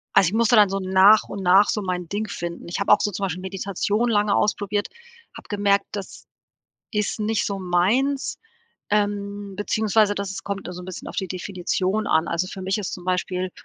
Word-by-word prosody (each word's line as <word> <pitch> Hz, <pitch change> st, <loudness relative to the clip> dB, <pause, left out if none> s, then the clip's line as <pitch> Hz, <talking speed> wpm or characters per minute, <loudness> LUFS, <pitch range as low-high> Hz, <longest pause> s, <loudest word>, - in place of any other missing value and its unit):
also, 190 Hz, -, +6 dB
ich 185 Hz, -, -2 dB
musste 230 Hz, +1 st, +3 dB
dann 210 Hz, -3 st, +6 dB
so 195 Hz, -, -2 dB
nach 190 Hz, +3 st, +6 dB
und 200 Hz, -, -5 dB
nach 190 Hz, +3 st, +5 dB
so 210 Hz, -, 0 dB
mein 180 Hz, -2 st, -3 dB
Ding 210 Hz, +4 st, -3 dB
finden. 170 Hz, 0 st, -6 dB
Ich 175 Hz, -, -3 dB
habe 200 Hz, +1 st, +4 dB
auch 210 Hz, -, +3 dB
so 210 Hz, -, +1 dB
zum 195 Hz, +2 st, -5 dB
Beispiel 180 Hz, -1 st, -4 dB
Meditation 200 Hz, +4 st, -1 dB
lange 205 Hz, -2 st, +2 dB
ausprobiert, 205 Hz, 0 st, 0 dB, 0.5 s
habe -, -, -13 dB
gemerkt, 200 Hz, -1 st, +2 dB
das 200 Hz, -2 st, -7 dB, 0.7 s
ist 210 Hz, +1 st, -1 dB
nicht 215 Hz, +1 st, 0 dB
so 200 Hz, -1 st, -3 dB
meins, 210 Hz, +11 st, +1 dB, 0.5 s
ähm, 205 Hz, -1 st, -1 dB
beziehungsweise 215 Hz, 0 st, +2 dB
das 195 Hz, -1 st, -4 dB
kommt 200 Hz, 0 st, -4 dB
immer 180 Hz, -, -6 dB
so 180 Hz, -, -8 dB
'n -, -, -10 dB
bisschen 185 Hz, -, -8 dB
auf -, -, -9 dB
die 190 Hz, -, -1 dB
Definition 185 Hz, +3 st, -2 dB
an. 160 Hz, +1 st, +2 dB
Also 170 Hz, +2 st, -1 dB
für 190 Hz, -, -8 dB
mich 190 Hz, +2 st, -1 dB
ist 200 Hz, -, -4 dB
zum 180 Hz, -, -7 dB
Beispiel 185 Hz, 0 st, -1 dB
200 Hz, 200 wpm, -23 LUFS, 185-210 Hz, 0.7 s, also